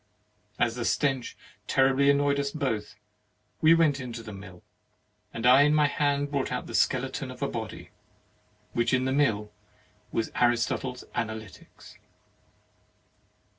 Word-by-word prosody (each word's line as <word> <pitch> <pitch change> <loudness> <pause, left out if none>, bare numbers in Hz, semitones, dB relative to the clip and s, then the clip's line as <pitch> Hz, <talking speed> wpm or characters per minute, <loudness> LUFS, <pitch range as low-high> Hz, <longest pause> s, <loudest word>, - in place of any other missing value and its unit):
As 120 -2 +1
the 120 0 -4
stench 135 -1 -1 0.3
terribly 135 +1 +3
annoyed 140 0 +2
us 140 0 -1
both, 130 -9 -3 0.7
we 160 +1 +7
went 155 -4 +2
into 120 -3 -7
the 110 - -9
mill; 95 -2 -12 0.7
and 115 - -5
I 130 +3 +7
in 150 +1 +4
my 150 -1 +4
hand 145 0 0
brought 140 -2 -1 0.2
the - - -9
skeleton - - 0
of - - -7
a - - +1
body, - - -7 0.8
which 120 +2 +2
in 130 0 0
the 130 - 0
mill 110 -7 +1 0.6
was 115 - -2
Aristotle's 125 +1 0
Analytics. 110 -3 -7
130 Hz, 130 wpm, -27 LUFS, 115-140 Hz, 0.8 s, we